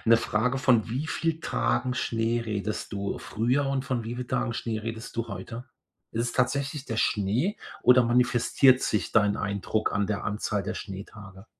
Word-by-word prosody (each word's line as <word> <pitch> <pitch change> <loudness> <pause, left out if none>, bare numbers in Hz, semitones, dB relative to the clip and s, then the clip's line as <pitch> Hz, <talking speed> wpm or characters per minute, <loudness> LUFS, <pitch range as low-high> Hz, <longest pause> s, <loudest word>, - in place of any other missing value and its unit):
'ne 115 0 +7
Frage: 115 +4 0
Von 125 -5 +3
wie 130 +7 -2
viel 165 0 -1
Tagen 125 -6 0
Schnee 115 -1 0
redest 105 0 -3
du 100 0 -3
früher 120 +7 0
und 135 -1 -1
von 125 -3 -2
wie 115 +2 -5
viel 125 0 -4
Tagen 115 - -1
Schnee 110 -1 -2
redest 115 +1 -6
du 115 0 -2
heute? 115 +6 -7 0.5
Ist 115 - 0
es 120 - -2
tatsächlich 135 +2 0
der 115 - -4
Schnee 115 - +1 0.3
oder 125 0 +7
manifestiert 125 +2 +4
sich 105 - 0
dein 105 -2 +4
Eindruck 100 +2 -1
an 100 -1 +1
der 105 -1 -2
Anzahl 105 -1 -1
der 110 +3 -4
Schneetage? 100 0 -9
115 Hz, 175 wpm, -27 LUFS, 105-125 Hz, 0.5 s, ne